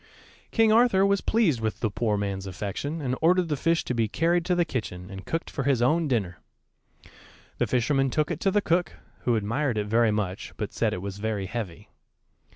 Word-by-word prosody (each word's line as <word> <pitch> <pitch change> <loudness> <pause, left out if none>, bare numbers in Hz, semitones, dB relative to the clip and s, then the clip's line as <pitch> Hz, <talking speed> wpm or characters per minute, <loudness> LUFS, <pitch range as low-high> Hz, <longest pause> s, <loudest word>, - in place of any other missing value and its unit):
King 225 -2 +3
Arthur 225 -4 +5
was 200 -1 +2
pleased 175 - +2
with 110 -1 -2
the 110 - 0
poor 105 -1 0
man's 100 -1 -3
affection, 105 - -4
and 130 -2 -1
ordered 175 +1 +3
the 150 - +1
fish 165 +4 +1
to - - -1
be 115 -2 +1
carried 170 +9 +1
to 180 - +1
the 175 -1 +2
kitchen 100 - -5
and 95 -1 -9
cooked 165 - -2
for 140 - -3
his 135 -3 +2
own 155 +7 +2
dinner. 100 -10 -1 1.2
The - - +2
fisherman 135 +2 +1
took 155 +4 0
it - - -3
to 195 - +2
the 205 +2 +2
cook, 170 -1 +1 0.3
who 120 - +3
admired 115 +4 0
it 105 - 0
very 115 +2 +3
much, 105 -3 -3
but - - -4
said - - +1
it 90 - -4
was 100 0 -5
very 105 -2 -2
heavy. 95 -4 -6
125 Hz, 205 wpm, -26 LUFS, 105-165 Hz, 1.2 s, Arthur